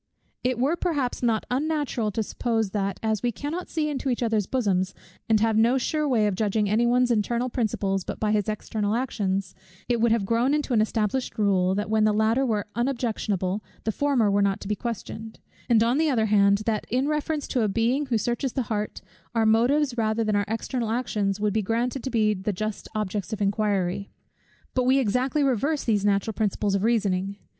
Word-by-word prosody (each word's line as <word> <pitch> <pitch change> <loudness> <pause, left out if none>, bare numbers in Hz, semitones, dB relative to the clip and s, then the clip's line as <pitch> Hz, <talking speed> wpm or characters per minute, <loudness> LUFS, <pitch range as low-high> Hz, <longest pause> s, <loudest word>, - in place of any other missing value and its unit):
It 250 -1 0
were 275 +7 +2
perhaps 300 -8 -1
not 230 -3 +1
unnatural 285 -5 0
to 220 - 0
suppose 225 -2 -1
that, 195 -2 -2
as 220 -2 0
we 245 - 0
cannot 300 - -5
see 315 -2 -1
into 280 -2 -2
each 245 -1 0
other's 220 -4 +1
bosoms, 190 -7 0 0.3
and 220 -1 +4
have 225 -1 +2
no 230 +4 +4
sure 300 +3 0
way 225 -5 +3
of 205 - +1
judging 210 +1 0
any 220 +4 +2
one's 245 0 +3
internal 235 +3 0
principles 195 -5 -1
but - - -6
by 215 -1 +1
his 210 -1 +1
external 215 0 -2
actions, 195 -6 -1 0.3
it 240 -2 +1
would 235 -1 +3
have 225 -3 +2
grown 235 +7 +2
into 295 -3 -1
an 220 - +4
established 220 +3 -1
rule, 190 -3 +2
that 205 +1 -2
when 220 0 +2
the 215 -1 +3
latter 220 +5 +2
were 215 -5 0
unobjectionable, 215 -6 -1 0.2
the 220 - 0
former 250 -4 +2
were 200 0 +2
not 200 -1 +1
to - - -7
be 210 - 0
questioned; 220 -1 -6 0.3
and 225 -2 +5
on 240 +5 +2
the 320 -1 +3
other 230 -5 +2
hand, 200 -1 +3
that 215 -2 -1
in 255 +4 +1
reference 300 0 -1
to 250 - +1
a 215 - +2
Being 235 +8 +1
who 240 -3 +1
searches 240 +4 -1
the 260 - 0
heart, 210 0 -3 0.3
our 225 -1 +3
motives, 245 +4 +3
rather 220 0 +1
than 215 -1 0
our 205 0 +1
external 230 +1 -2
actions, 215 -4 -1
would 210 -1 0
be 220 - +1
granted 235 +5 -1
to 265 - -2
be 215 -3 +2
the 200 +1 -2
just 215 +2 -4
objects 210 0 -2
of 215 - -4
inquiry. 200 -2 0 0.6
But 255 -1 +1
we 260 +2 +4
exactly 260 +4 +1
reverse 275 +3 +1
these 210 -4 +1
natural 205 +2 +1
principles 205 -1 0
of 195 - +1
reasoning. 200 -4 0
225 Hz, 205 wpm, -25 LUFS, 205-250 Hz, 0.6 s, and